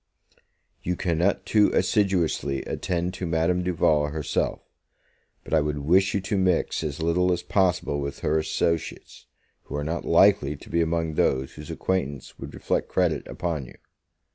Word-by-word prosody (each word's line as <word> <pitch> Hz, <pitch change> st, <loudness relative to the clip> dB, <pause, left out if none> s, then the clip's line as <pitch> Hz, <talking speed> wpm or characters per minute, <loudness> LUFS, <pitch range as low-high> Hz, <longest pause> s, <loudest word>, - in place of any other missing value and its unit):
You 90 Hz, -, -1 dB
cannot 90 Hz, +2 st, 0 dB
too 105 Hz, -2 st, +4 dB
assiduously 90 Hz, -, +1 dB
attend 90 Hz, 0 st, -2 dB
to 95 Hz, -2 st, -4 dB
Madame 85 Hz, +2 st, +1 dB
Duval 80 Hz, -4 st, +2 dB
herself; 75 Hz, 0 st, -2 dB, 0.8 s
but -, -, -7 dB
I 80 Hz, -, +5 dB
would 75 Hz, 0 st, -2 dB
wish 95 Hz, +7 st, +3 dB
you 100 Hz, -, +1 dB
to 100 Hz, +1 st, -1 dB
mix 90 Hz, -3 st, +1 dB
as 75 Hz, +1 st, -3 dB
little 90 Hz, +2 st, +2 dB
as 90 Hz, 0 st, -1 dB
possible 90 Hz, -6 st, +1 dB
with 70 Hz, 0 st, -5 dB
her 80 Hz, +1 st, +1 dB
associates, 80 Hz, +1 st, -2 dB, 0.4 s
who -, -, -7 dB
are 75 Hz, -, -2 dB
not 80 Hz, +3 st, -3 dB
likely 85 Hz, -4 st, +4 dB
to -, -, -14 dB
be 85 Hz, -, +2 dB
among 80 Hz, -1 st, 0 dB
those 65 Hz, -3 st, +1 dB
whose 75 Hz, -1 st, -10 dB
acquaintance 75 Hz, -8 st, -3 dB
would -, -, -8 dB
reflect -, -, -1 dB
credit 85 Hz, -5 st, 0 dB
upon 80 Hz, -7 st, -3 dB
you. -, -, -14 dB
85 Hz, 160 wpm, -25 LUFS, 75-90 Hz, 0.8 s, I